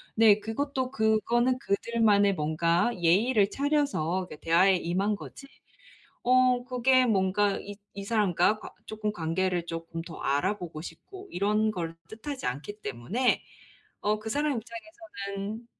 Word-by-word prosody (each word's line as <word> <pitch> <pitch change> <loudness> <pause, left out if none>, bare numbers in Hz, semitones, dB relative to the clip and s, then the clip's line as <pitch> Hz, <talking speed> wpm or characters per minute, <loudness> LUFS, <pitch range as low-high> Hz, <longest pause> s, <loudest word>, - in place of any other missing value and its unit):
네 215 -2 +6
그것도 260 +4 -3
그거는 235 +2 +2
그들만의 205 -3 +2
뭔가 165 +6 +1
예의를 200 +5 +3
차려서 275 - 0
그 150 - -9
대화에 180 +4 +4
임한 190 +5 0
거지 275 - -11 0.8
어 250 0 +4
그게 255 0 +3
뭔가 200 -1 +2
이 205 0 -9 0.2
이 200 - -6
사람과 210 -1 +2
관 - - -9 0.2
쪼끔 215 -1 -3
관계를 175 0 -1
쪼끔 165 0 -5
더 165 -1 -10
알아보고 170 +2 -1
싶고 385 - -11
이런 210 +3 +1
걸 165 -3 -4
뜻하지 260 +5 -6
않기 145 +12 -5
때문에 180 - 0 0.6
어 210 +1 +1
그 215 - -7
사람 290 -1 0
입장에서는 225 -4 -7
210 Hz, 275 characters per minute, -28 LUFS, 180-240 Hz, 0.8 s, 네